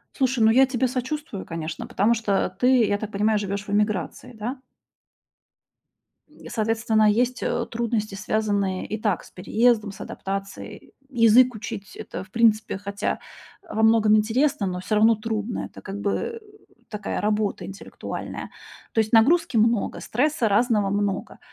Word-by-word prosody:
Слушай, 260 -2 +1
ну, 220 - +6
я 265 +3 +6
тебе 255 -1 0
сочувствую, 255 -3 -4
конечно, 165 -1 -5
потому 215 +5 +2
что 210 -4 0
ты, 250 -1 +4
я 205 - +1
так 215 0 -6
понимаю, 210 +1 +1
живёшь 200 0 -4
в - - -5
эмиграции, 210 +3 -1
да? 240 +5 -5 1.9
Соответственно, 220 -1 +2
есть, 245 +2 0
э, - - -1
трудности, 225 -3 -2
связанные 205 -2 -1
и 215 - -4
так 205 -6 0
с - - -16
переездом, 220 +2 +1
с - - -13
адаптацией. 195 0 -6 0.2
Язык 240 0 +5
учить- 205 -1 -7
это, - - -7
в 190 - -18
принципе, 220 -3 +2
хотя, 200 +1 -3 0.4
э, 340 - -11
во 220 - 0
многом 220 -1 +5
интересно, 225 0 +1
но 180 0 -3
всё 215 +3 -2
равно 220 +2 +5
трудно. 220 +1 -3
Это - - -12
как 200 +1 -6
бы 460 - -2 0.5
такая 210 -1 -4
работа 210 -1 -1
интеллектуальная. 195 +1 -7 0.4
То 225 - +1
есть 215 -1 +1
нагрузки 255 +2 +4
много, 225 -1 +2
стресса 255 0 0
разного 210 -1 +2
много. 200 -1 -2
215 Hz, 150 wpm, -24 LUFS, 205-235 Hz, 1.9 s, ну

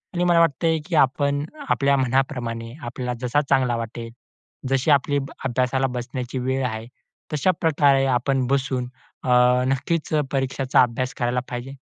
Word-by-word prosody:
आणि 175 - +1
मला 175 -1 +4
वाटतंय, 165 0 +2
की 175 - -3
आपण 145 0 +2 0.2
आपल्या 140 0 +3
मनाप्रमाणे 125 -3 -1
आपल्याला 125 +1 -4
जसा 135 +4 +2
चांगला 130 -3 +2
वाटेल 115 0 -6 0.6
जशी 135 +3 +2
आपली 145 0 +3
अभ 135 -1 -3 0.2
अभ्यासाला 130 +1 +1
बसण्याची 125 +1 -5
वेळ 130 +1 -1
आहे. 110 -1 -5 0.5
तशा 150 +5 +2
प्रकारे 145 -4 +3
आपण 130 +1 +1
बसून 130 -2 0 0.4
अ, - - -1 0.4
नक्कीच 140 +5 -1 0.2
परीक्षांचा 135 -1 +1
अभ्यास 125 +1 0
करायला 120 +1 0
पाहिजे. 125 +2 -5
130 Hz, 140 wpm, -23 LUFS, 125-140 Hz, 0.6 s, मला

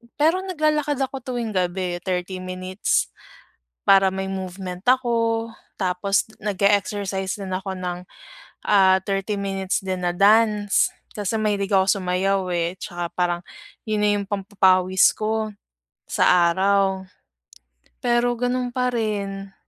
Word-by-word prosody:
Pero 320 +5 +3
naglalakad 305 -5 0
ako 270 0 -4
tuwing 240 -3 -4
gabi, 180 -1 -1
30 185 0 -3
minutes 185 +1 -1 0.7
para 195 -1 +6
may 190 0 -3
movement 185 0 -6
ako, 230 -3 +2 0.3
tapos 195 +1 0 0.2
nag-e-exercise 200 -1 0
din 195 -2 -7
ako 190 +1 -3
ng, 180 0 -5 0.6
ah, 190 -2 +5
30 200 +1 -2
minutes 195 -1 -1
din 185 -1 -3
na 175 - +1
dance, 210 +1 +3 0.2
kasi 210 +1 -2
mahilig 205 -2 -1
ako 190 -1 +4 0.2
sumayaw 190 +2 +1
eh, 170 0 0
tsaka 175 -1 -5
parang 175 -1 0 0.5
yun 215 -1 0
na 210 - +4
yung 200 - -5
pampapawis 190 -2 +3
ko 215 0 -2 0.6
sa 175 -1 +4
araw, 190 +1 +1 1.0
pero 240 0 +2
ganun 245 0 -1
pa 250 -1 +1
rin. 200 -4 -3
195 Hz, 120 wpm, -23 LUFS, 185-215 Hz, 1.0 s, para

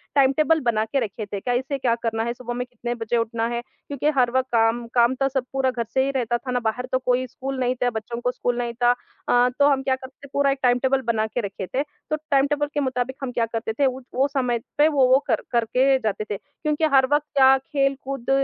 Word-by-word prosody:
Time 270 -1 +5
table 320 +1 +4
बना 230 -4 +1
के 270 +5 -1
रखे 215 -1 -4
थे। 200 -1 -5
कैसे 255 +5 -1
क्या 250 -3 +1
करना 225 -1 0
है, 235 +1 -2
सुबह 240 0 -6
में 245 +1 -3
कितने 240 -1 -4
बजे 230 0 -1
उठना 230 0 -1
है, 235 0 -2
क्योंकि 285 +3 -4
हर 245 -2 +3
वक़्त 260 0 +1
काम 225 +1 +2
काम 240 0 +4
तो 270 +1 +1
सब 265 -1 -2
पूरा 265 -1 +1
घर 240 -2 -2
से 265 - +3
ही 275 - 0
रहता 240 -3 0
था 255 +2 -6
ना, 250 - +1
बाहर 235 +2 -2
तो 260 - +2
कोई 255 0 +1
स्कूल 265 +2 -5
नहीं 250 0 +1
था, 245 - +3
बच्चों 235 +2 -5
को 250 +1 0
स्कूल 245 -1 -2
नहीं 240 -1 -2
था। 240 - +6
अ, 250 -6 0
तो 285 - +6
हम 270 -2 +1
क्या 265 -1 +1
करते 260 0 -12
थे, - - -14
पूरा 280 0 +3
एक 275 - -2
टाइम 245 0 +4
टेबल 265 +1 +1
बना 220 -1 0
के 245 +3 -3
रखे 200 -2 -5
थे। 270 +8 -1 0.3
तो 310 - +1 0.2
टाइम 275 0 +4
टेबल 295 0 0
के 295 - 0
मुताबिक 260 -1 -1
हम 255 - -2
क्या 235 -1 0
करते 225 0 -3
थे, 280 +5 +1
उत 260 -1 -2
वो 265 +2 +3
समय 255 -4 0 0.2
पे 295 +1 +6
वो 275 -4 +3
वो 260 +1 +5
कर - - +1
करके 250 +3 +3
जाते 215 -2 -2
थे, 200 - -1
क्योंकि 300 +4 -2
हर 265 -1 +6
वक़्त 295 0 +2
क्या, 265 -1 +7
खेल-कूद 275 -2 -2
255 Hz, 255 wpm, -23 LUFS, 235-270 Hz, 0.3 s, क्या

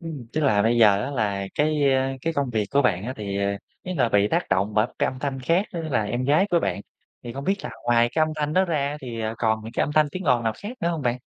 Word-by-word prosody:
Ừm, 155 -8 -7
tức 155 - 0
là 110 -9 +3
bây 115 +2 +2
giờ 105 -3 +5
á 140 - -4
là 100 -7 -1
cái, 150 -2 +2
a, 130 0 +1
cái 165 - 0
công 140 -4 -1
việc 110 -3 0
của 140 - +3
bạn 95 -6 +1
á 125 - -3
thì, 100 -2 -4
à, 100 0 -1 0.2
ý 185 - -4
là 125 -7 +2
bị 105 -1 +3
tác - - 0
động 95 +3 +1
bởi 105 +1 +3
cái - - +2
âm 130 - -4
thanh 135 -1 -3
khác, 170 +9 +1
tức 170 - -3
là 140 -9 0
em 120 +5 -2
gái 150 +8 +3
của 170 - +3
bạn, 100 - -2 0.4
thì 120 - -7
không 140 +2 -6
biết 195 +4 +1
là - - -4
ngoài 120 0 +3
cái 160 - +2
âm 155 - +2
thanh 150 0 -1
đó 185 +3 +3
ra 150 -6 0
á 145 - -4
thì, 120 -3 -6
à, 110 0 -2
còn 110 -1 0
những 115 - -8
cái - - 0
âm 150 - -4
thanh 155 0 +4
tiếng 185 +1 -5
ồn 125 -5 +3
nào 110 - +1
khác 220 +5 -6
nữa 170 - +1
hông 165 -3 -2
bạn? 125 0 0
130 Hz, 305 wpm, -24 LUFS, 110-155 Hz, 0.4 s, giờ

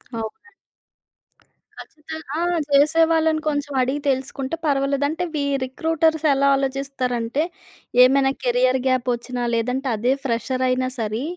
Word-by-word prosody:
అవునండి. 225 - -6 1.3
ఖచ్చితంగా 305 -1 -9
ఆ! - - -1 0.3
చేసేవాళ్ళని 320 +2 +3
కొంచెం 290 -1 -1
అడిగి 265 +3 -1
తెలుసుకుంటే 270 +2 -2
పర్వాలేదు. 280 -1 +1
అంటే 320 +4 -3
వీ 290 - 0 0.2
రిక్రూటర్స్ 320 +3 0
ఎలా 275 +1 +2
ఆలోచిస్తారంటే 270 -1 -2 0.6
ఏమైనా 270 +1 +4
కెరియర్ 255 +1 +2
గ్యాప్ 255 -1 +1
వచ్చినా 245 +1 -4
లేదంటే 250 +4 -1
అదే 240 +5 +1
ఫ్రెషర్ 250 0 -1
అయినా 255 0 +1
సరి 220 +2 -2
270 Hz, 115 wpm, -22 LUFS, 255-295 Hz, 1.3 s, ఏమైనా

